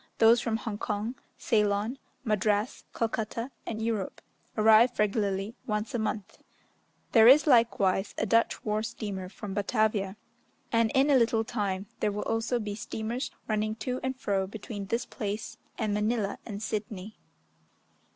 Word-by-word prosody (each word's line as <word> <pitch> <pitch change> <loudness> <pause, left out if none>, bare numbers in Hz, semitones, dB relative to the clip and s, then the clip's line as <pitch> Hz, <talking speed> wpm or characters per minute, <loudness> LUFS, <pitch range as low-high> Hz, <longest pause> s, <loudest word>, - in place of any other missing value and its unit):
Those 230 +1 +6
from 225 -2 0
Hong 220 -2 -5
Kong, 210 +2 -2 0.2
Ceylon, 210 +3 +1 0.2
Madras, 215 0 0
Calcutta, 230 +2 -2 0.2
and 220 -1 -3
Europe 220 -4 -2 0.4
arrive 220 +3 +6
regularly 205 0 0
once 210 +4 -2
a 240 - 0
month; 210 -2 -3 0.7
there 225 -1 +7
is 280 +6 +8
likewise 230 - +3
a - - +1
Dutch 230 +2 +2
war 215 0 +1
steamer 205 -4 -5
from 205 0 -7
Batavia, 210 -1 0 0.5
and 230 -1 +3
in 275 +2 +4
a - - +6
little 230 -2 +3
time 205 -5 -2
there 210 - +1
will 205 +1 -3
also 225 +2 0
be 210 -2 -4
steamers 220 +3 -4 0.2
running 215 0 0
to 250 +2 -3
and 260 0 -3
fro 195 -5 0
between 205 0 -7
this 235 +5 -1
place, 210 -2 -5 0.2
and 215 -3 0
Manilla 210 0 0
and 205 -1 -5
Sidney. 210 -1 -4
215 Hz, 145 wpm, -29 LUFS, 205-230 Hz, 0.7 s, is